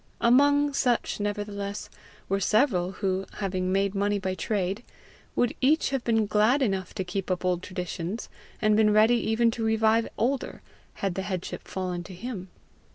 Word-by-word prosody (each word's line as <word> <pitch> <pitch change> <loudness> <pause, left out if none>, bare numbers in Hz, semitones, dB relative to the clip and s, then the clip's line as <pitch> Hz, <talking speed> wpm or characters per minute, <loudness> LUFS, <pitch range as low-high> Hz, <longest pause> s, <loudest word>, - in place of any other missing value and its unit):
Among 285 +4 +4
such 245 -6 +1
nevertheless 205 -1 -3 0.4
were 195 +1 0
several 195 -3 +2
who, 190 -1 -2
having 185 -2 -2
made 195 0 +1
money 205 +1 +1
by 190 -1 -2
trade, 195 +1 -2 0.5
would 245 - +2
each 290 +2 +3
have 270 -3 -1
been 225 -2 +2
glad 215 +7 +3
enough 195 -5 -2
to 190 - -1
keep 185 +1 -4
up 185 0 -1
old 180 -1 +1
traditions, 180 +2 -5 0.3
and 215 0 +3
been 215 -1 +4
ready 220 +3 +5
even 230 +1 +2
to 225 0 -4
revive 220 +1 +3
older, 265 +4 -1 0.4
had 195 - 0
the 190 - -3
headship 185 -2 -5
fallen 180 -2 -3
to 185 - -9
him. 195 -2 -6
205 Hz, 160 wpm, -27 LUFS, 190-230 Hz, 0.5 s, ready